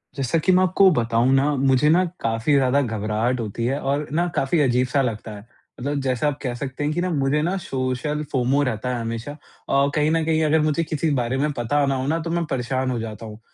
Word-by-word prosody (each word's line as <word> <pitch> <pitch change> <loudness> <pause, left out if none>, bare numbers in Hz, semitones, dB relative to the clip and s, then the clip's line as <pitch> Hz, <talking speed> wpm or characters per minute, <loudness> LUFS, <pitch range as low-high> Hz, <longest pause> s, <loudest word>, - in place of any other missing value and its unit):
जैसा 135 +3 0
कि 175 +4 +2
मैं 185 +1 +4
आपको 185 +1 +5
बताऊँ 120 -2 +1
ना, 140 +2 +2
मुझे 135 +2 +3
ना 175 +4 +4 0.2
काफ़ी 115 +5 0
ज़्यादा 135 0 +3
घबराहट 110 +1 -1
होती 115 +1 -3
है 135 +3 0
और 140 +2 -1
ना 170 +3 +1
काफ़ी 135 +5 +1
अज़ीब-सा 125 +1 +2
लगता 115 -3 -3
है। 100 +1 -12 0.3
मतलब 140 +3 -2
जैसा 130 +1 0
आप 145 -1 -1
कह 125 -3 -2
सकते 135 +2 -5
हैं 150 +1 0
कि 175 - -1
ना 185 - -1
मुझे 145 -2 +1
ना, 175 +5 -1
सोशल 135 -1 -3
फ़ोमो 130 +2 +1
रहता 125 -1 -2
है 120 - -3
हमेशा। 115 +4 -4
अ, 140 -1 -2
कहीं 150 0 +2
न 165 0 +1
कहीं 160 0 +1
अगर 155 +1 +3
मुझे 155 +2 +1
किसी 155 0 -2
बारे 120 +2 -2
में 150 +2 0
पता 140 +5 +1
ना 135 0 0
हो 130 0 -2
ना 160 +3 0
तो 165 +1 -5
मैं 170 0 0
परेशान 130 +1 -1
हो 120 - -2
जाता 110 0 -6
हूँ। 105 0 -10
135 Hz, 235 wpm, -22 LUFS, 125-150 Hz, 0.3 s, आपको